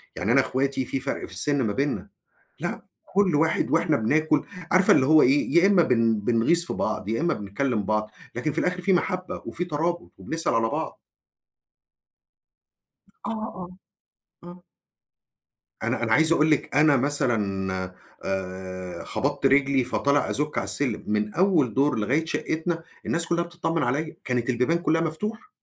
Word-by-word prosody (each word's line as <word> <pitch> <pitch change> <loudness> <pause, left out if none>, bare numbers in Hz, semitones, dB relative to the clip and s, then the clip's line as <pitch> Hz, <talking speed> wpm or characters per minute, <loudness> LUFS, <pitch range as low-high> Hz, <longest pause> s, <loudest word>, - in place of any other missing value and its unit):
يعني 100 +5 -1
أنا 135 +3 +5
إخواتي 135 0 -1
في 135 - -2
فرْق - - -3
في - - -9
السِّن 145 -2 0
ما 105 -4 0
بيننا، 140 +1 -2 0.5
لأ - - -4 0.3
كل 195 -5 +3
واحد 160 +1 +1
وإحنا 165 -2 +2
بناكل، 150 +6 +1 0.3
عارفة 185 +1 +6
اللي 130 - +4
هو 155 +1 +6
إيه، 135 +3 +2
يا 180 - +5
إمّا 195 -4 +5
بن 115 -5 +2
بنغيظ 120 +10 +2
في - - -1
بعض 105 -2 -2
يا 115 +6 -1
إمّا 170 0 +1
بنتكلّم 105 +3 -2
بعض، 105 +1 -1 0.2
لكن 125 +6 -2
في 160 - -2
الآخِر 180 0 0
في 195 - +2
مَحبّة 185 0 -1
وفي 180 - -2
ترابُط 170 +1 -2
وبنسأل 165 0 -2
على 115 0 +2
بعض. - - -4 2.3
آه، - - -2
آه، 215 -5 -6 0.8
آه. 175 +1 -12 1.2
أنا - - -1
أنا 115 -1 +1
عايز 160 +5 +4
أقول 155 -1 +3
لِك 150 - 0
أنا 145 -1 +5
مثلًا 100 -9 -1 0.3
آآ 95 -1 -5
خبطت - - -2
رجلي 135 -1 +3
فطالع 140 +2 +1
أزُوك 150 +1 -2
على - - 0
السلّم 140 -2 -2
من 105 0 -1
أول 170 - +2
دور 135 -3 +2
لغاية 140 +10 0
شقّتنا 160 +1 -2 0.2
الناس 165 0 0
كلّها 170 0 +1
بتتطمن 170 -1 -2
عليَّ، 150 +6 -2
كانت 125 -1 -1
البيبان 125 +7 +1
كلّها 165 -2 +1
مفتوحة. 210 - -4
145 Hz, 160 wpm, -25 LUFS, 115-165 Hz, 2.3 s, عارفة